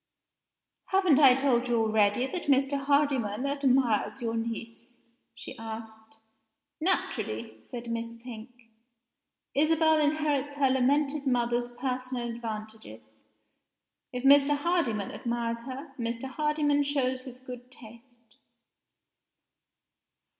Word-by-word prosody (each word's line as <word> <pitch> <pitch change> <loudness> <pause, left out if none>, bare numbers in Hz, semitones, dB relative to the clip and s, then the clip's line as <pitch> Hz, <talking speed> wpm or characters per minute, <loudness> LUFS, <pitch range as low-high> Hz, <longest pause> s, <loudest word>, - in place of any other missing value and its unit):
"Haven't 375 -7 +3
I 265 -4 +8
told 255 -2 +1
you 240 -1 +2
already 220 +1 +2
that 345 +6 -5
Mr. 275 0 +3
Hardyman 275 -5 +1
admires 265 -5 +1
your 230 -2 -2
niece?" 230 +1 -6 0.4
she - - -8
asked. 220 0 -9 0.6
"Naturally," 110 - -2
said 235 - -8
Miss 230 0 -4
Pink. 235 -1 -9 1.0
"Isabel 315 +2 +3
inherits 295 -2 0
her 275 -2 +2
lamented 280 +2 +1
mother's 240 -1 +1
personal 255 0 -3
advantages. 215 - -8 0.9
If 250 0 -5
Mr. 285 +1 +6
Hardyman 285 - 0
admires 235 -1 -3
her, 270 +2 -7
Mr. 235 +1 -3
Hardyman 295 +1 +1
shows 265 -3 0
his 255 -1 -10
good 250 -1 -10
taste." 235 0 -16
250 Hz, 105 wpm, -28 LUFS, 230-280 Hz, 1.0 s, I